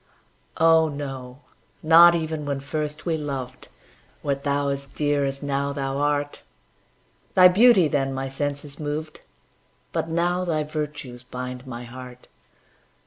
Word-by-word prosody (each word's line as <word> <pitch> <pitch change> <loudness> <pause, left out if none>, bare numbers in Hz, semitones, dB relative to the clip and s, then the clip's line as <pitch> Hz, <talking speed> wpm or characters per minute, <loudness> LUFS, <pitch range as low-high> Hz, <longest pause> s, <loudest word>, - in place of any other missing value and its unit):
Oh, 160 0 +5
no 135 -2 -7 0.4
not 170 +2 +8
even 160 -2 -3
when 140 -1 -2
first 150 +2 -4
we 165 -2 0
loved, 135 -4 -6 0.6
Wert 140 -1 -2
thou 140 0 0
as 140 0 -3
dear 145 +1 0
as 135 +1 -4
now 140 0 -1
thou 135 -1 -3
art; 145 0 -1 0.9
Thy 185 -1 +9
beauty 195 -1 +6
then 135 -2 0
my 135 0 -3
senses 145 +1 -4
moved, 155 +1 -5 0.7
But 165 - -2
now 175 +2 0
thy 160 -4 0
virtues 150 -5 -5
bind 125 +1 -7
my 120 -1 -6
heart. 125 +1 -11
145 Hz, 135 wpm, -24 LUFS, 135-155 Hz, 0.9 s, Thy